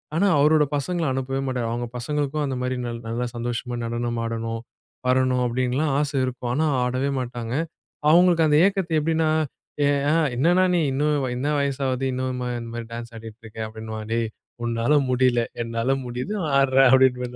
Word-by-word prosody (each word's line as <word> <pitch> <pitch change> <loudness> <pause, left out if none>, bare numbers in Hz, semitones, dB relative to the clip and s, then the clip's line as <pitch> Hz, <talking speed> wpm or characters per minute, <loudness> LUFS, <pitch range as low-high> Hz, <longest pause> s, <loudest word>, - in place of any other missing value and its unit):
ஆனா 200 +4 +3
அவரோட 150 +1 +5
பசங்கள 165 +4 -2
அனுப்பவே 135 +1 -2
மாட்டாரு. 125 -3 -1
அவங்க 120 0 -3
பசங்களுக்கும் 145 +3 -1
அந்த 135 -2 -2
மாதிரி 125 0 -1
நல் 115 -1 -5
நல்லா 120 +2 -2
சந்தோஷமா 120 +1 -3
நடனம் 120 0 -2
ஆடணும், 115 0 -3 0.5
வரணும் 130 -1 +2
அப்டின்னுலாம் 130 +4 0
ஆசை 145 -1 -1
இருக்கும். 125 -1 -4
ஆனா 155 +4 +1 0.2
ஆடவே 130 +3 -1
மாட்டாங்க. 120 -2 -4 0.6
அவங்களுக்கு 170 -1 +5
அந்த 150 0 +4
ஏக்கத்த 190 -5 0
எப்டின்னா, 160 +1 +1 1.1
என்னண்ணா 175 +8 +3
நீ - - +3
இன்னும் 145 0 +1
என்ன 130 +4 -2
வயசு 140 -1 -1
ஆகுது? 130 0 -1
இன்னும் 130 0 -2 0.2
இந்த 115 - -7
மாதிரி 115 -1 -5
டான்ஸ் 115 0 -7
ஆடிக்கிட்டு 115 +1 -11
இருக்கிறே. 110 0 -6
அப்படின்னுவான். 110 0 -7
டேய் 115 -1 0 0.4
உன்னால 115 +4 +1 0.2
முடியல. 125 -1 +3 0.2
என்னால 115 +3 0
முடியுது 125 +10 -4 0.3
ஆடுறேன். 135 -1 +5
அப்படின்னுவேன் 125 -2 +3
125 Hz, 155 wpm, -24 LUFS, 120-145 Hz, 1.1 s, அவரோட